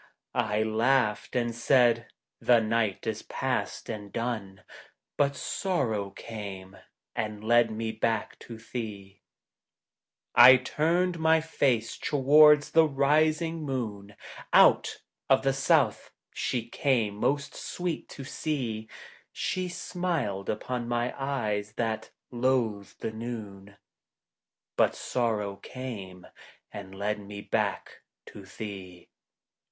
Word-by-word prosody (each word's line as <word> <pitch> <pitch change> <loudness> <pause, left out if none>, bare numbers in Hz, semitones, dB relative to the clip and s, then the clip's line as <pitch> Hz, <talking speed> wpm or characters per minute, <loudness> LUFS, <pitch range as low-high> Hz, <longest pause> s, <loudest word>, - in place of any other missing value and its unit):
I 105 +1 +1
laughed 110 0 +1
and 120 -1 0
said, 115 -1 +3 0.2
" - - -59
The 120 -1 +5
night 110 -2 0
is 110 -1 -2
past - - -3
and 105 -3 -6
done 110 -5 -4 0.3
"; - - -44
But 140 -1 +1
Sorrow 125 - -1
came 100 -3 -8 0.4
and 105 -1 -3
led 120 +1 +4
me 110 0 -3
back 110 0 -2
to 115 - -10
thee. 105 -4 -7
THE - - -5
TRAVELLING 130 +2 +11
COMPANION - - +1
I - - -15
turned 170 +5 +1
my 160 0 +4
face 135 -8 0
towards 150 +1 +5
the 160 -1 +5
rising 155 +3 +2
moon, 110 -8 -4 0.4
Out - - +5 0.3
of - - +4
the 135 0 +2
south 135 -3 +2 0.2
she 120 -2 -2
came 120 -5 +1
most 140 +7 -1
sweet 175 -2 -4
to 140 - -8
see, 125 -7 -3 0.4
She 185 -1 -2
smiled 175 - -3
upon 120 +2 -3
my 120 +1 -1
eyes 105 -7 -2
that 110 -1 -2 0.2
loathed 120 -5 -1
the - - -2
noon; 105 -4 -7 1.0
But - - +3
Sorrow 105 -5 -1
came 100 -10 -8 0.5
and 95 -2 -8
led 105 +2 -2
me 100 0 -8
back - - -2 0.2
to 100 - -12
thee. 95 -4 -9
115 Hz, 120 wpm, -28 LUFS, 105-135 Hz, 1.0 s, TRAVELLING